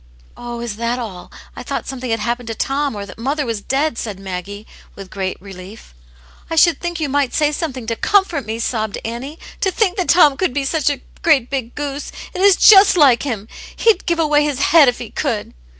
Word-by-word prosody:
" - - -28
Oh, 240 -1 -7
is 235 -3 -5
that 235 +2 -1
all? 210 -7 -7 0.2
I - - -7
thought - - -4
something 255 -2 -6
had 225 0 0
hap 240 +2 -1
pened 245 - -12
to 225 - -4
Tom, 275 0 -1
or 200 -1 -5
that 185 +2 -13
mother 280 +5 -1
was 225 -4 -3
dead," 270 +2 -1
said 205 -4 -5
Maggie, 195 +2 -7 0.3
with 195 -2 -11
great 190 -1 -4
relief. 195 - -12 0.3
" - - -26
I 325 - -2
should 325 -1 +4
think 345 -1 -4
you 310 - -1
might 280 -2 0
say 300 -1 +2
something 280 -6 -4
to 230 0 -2
com 400 - +3
fort 330 - -5
me 220 - -3
I" - - -5
sobbed 220 -2 -2
Annie. 250 +7 -6 0.2
*^ - - -29
To 385 - +1
think 385 0 0
that 365 - -2
Tom 300 -6 +5
could 370 -8 -1
be 280 -1 -1
such 300 0 +1
a 280 -3 -3 0.2
great 275 -7 +2
big 255 -4 -4
goose 290 0 -5 0.2
I - - -6
It - - -1
is 395 -1 +6
just 395 -2 +7
like 275 -7 +5
him! 225 -7 -4 0.3
He'd 450 -5 +2
give 340 -1 +1
away 300 -2 +3
his 295 -3 -1 0.2
head 315 -4 +8
if 245 - -3
he 240 - -8
could." 235 -8 -3
260 Hz, 245 wpm, -18 LUFS, 225-305 Hz, 0.3 s, head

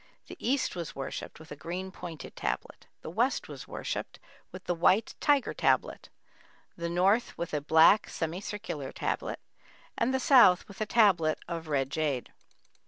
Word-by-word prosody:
The - - -10
East 265 -2 0
was 170 -4 -5
worshipped 135 -1 -6
with 160 - -14
a - - -5
green 180 +5 -5
pointed 170 -5 -9
tablet; - - -4 0.2
the - - -6
West 240 +9 0
was - - -9
worshipped - - -5 0.3
with 185 - -9
the 175 - -1
white 185 +5 +2
"tiger 290 -4 +2
tablet"; - - 0 0.7
the 170 -1 -4
North 195 +7 +2
with 170 - -4
a 150 - 0
black, 160 +7 +5
semi 165 +3 -3
circular 205 -10 -5
tablet, - - -3 0.6
and 230 +3 +1
the 265 - +1
South 245 -9 +6
with 200 +1 -11
a 215 - 0
tablet 185 -9 +4
of 165 -2 -5
red 135 -3 0
jade. 145 -6 -2
175 Hz, 165 wpm, -29 LUFS, 160-215 Hz, 0.7 s, South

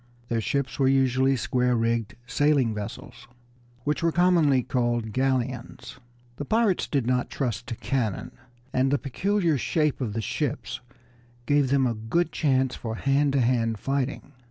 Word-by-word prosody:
Their 115 -1 0
ships 140 +5 -2
were 135 - +4
usually 135 0 +3
square 125 0 +1
rigged 115 -1 0
sailing 140 -4 +2
vessels, 105 -1 -8 0.6
which 150 +2 -1
were 165 0 +2
commonly 165 -7 +3
called 120 -3 -1
galleons. 130 -1 -2 0.4
The - - -4
pirates 215 +3 +1
did 140 -5 0
not 125 0 0
trust 120 -4 -3
to 120 - -4
cannon, 115 -5 -2 0.4
and 130 +1 +2
the 145 - +2
peculiar 170 +3 0
shape 150 +1 0
of 110 -5 -2
the 115 - -2
ships 130 0 -3 0.6
gave 145 -2 +2
them 135 -1 +3
a 120 - +1
good 115 +10 -1
chance 130 -4 +1
for 110 -2 -5
hand 140 +3 +1
to 140 - +3
hand 115 -2 +1
fighting. 140 +4 -3
130 Hz, 155 wpm, -26 LUFS, 120-145 Hz, 0.6 s, were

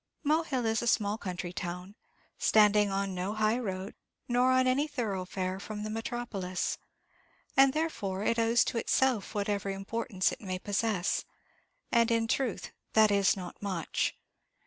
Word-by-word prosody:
Mohill 295 -5 +1
is 225 0 +1
a 235 - -2
small 210 -3 +2
country 180 -3 -5
town, 180 +1 -5 0.5
standing 210 -1 +5
on 195 0 -1
no 185 +3 -3
high 215 +2 +2
road, 190 -3 -4 0.3
nor 250 +1 +3
on 255 0 +4
any 265 +4 +2
thoroughfare 190 -7 -3
from 210 +1 -6
the 215 - -4
metropolis; 225 -5 -3 0.8
and 270 0 +6
therefore 210 -12 -2
it 230 +2 +1
owes 230 +1 +4
to 235 - -1
itself 250 -3 +1
whatever 200 -1 -1
importance 195 0 -1
it - - -8
may 185 -2 -3
possess 205 -1 0 0.7
and, 235 -1 +4
in 230 -1 +2
truth, 250 0 -1 0.2
that 215 -1 +6
is 200 -1 +3
not 180 -2 -8
much. 185 -6 -1
210 Hz, 145 wpm, -30 LUFS, 195-235 Hz, 0.8 s, and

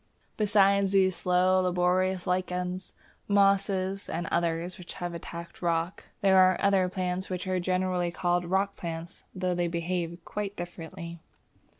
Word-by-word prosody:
Besides 200 -2 +3
these 190 -2 +4
slow, 185 +1 +3
laborious 180 +1 +1
lichens, 180 0 -2 0.3
mosses, 195 -1 +2
and 170 +1 -2
others 170 +2 -1
which 175 - -9
attack 170 -1 -6
rock, 170 +1 -1 0.2
there 190 -1 +5
are 185 0 +5
other 195 -2 +3
plants 185 0 -2
which 185 0 -3
are 185 -1 0
generally 185 0 0
called 175 0 0
rock 195 +3 0
plants, 165 0 -7
though 185 -1 0
they 175 0 0
behave 170 0 -2
quite 205 -1 -4
differently. 170 -1 -7
180 Hz, 130 wpm, -28 LUFS, 175-190 Hz, 0.3 s, there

